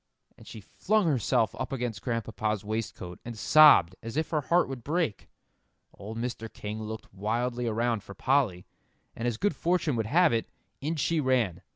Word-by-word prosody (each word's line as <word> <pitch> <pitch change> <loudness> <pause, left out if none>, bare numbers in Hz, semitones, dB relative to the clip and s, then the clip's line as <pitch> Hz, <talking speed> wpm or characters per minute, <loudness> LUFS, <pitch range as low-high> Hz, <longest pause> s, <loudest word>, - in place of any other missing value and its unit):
And - - -17
she 110 - -9
flung 210 - 0
herself 120 -6 +1
up 130 - -3
against 120 -5 -3
Grandpapa's 110 -3 -2
waistcoat, 105 -5 -5
and 115 -1 -7
sobbed 145 - +6
as 115 +4 -6
if 160 - -1
her 155 -2 +1
heart 170 +6 +2
would 130 -3 -7
break. 150 - -2 0.6
Old 110 +3 -8
Mr. 115 -2 -4
King 105 +1 -6
looked 110 -1 -7
wildly 120 +5 -2
around 115 0 0
for 100 0 -12
Polly. 130 -10 +1 0.5
And 115 - -3
as 120 -3 -1
good 200 -4 0
fortune 170 -3 0
would 110 -1 -1
have 170 +3 +4
it, 115 - -1 0.3
in 155 +4 -2
she 160 +2 0
ran. 130 - +1
120 Hz, 175 wpm, -28 LUFS, 110-145 Hz, 0.6 s, sobbed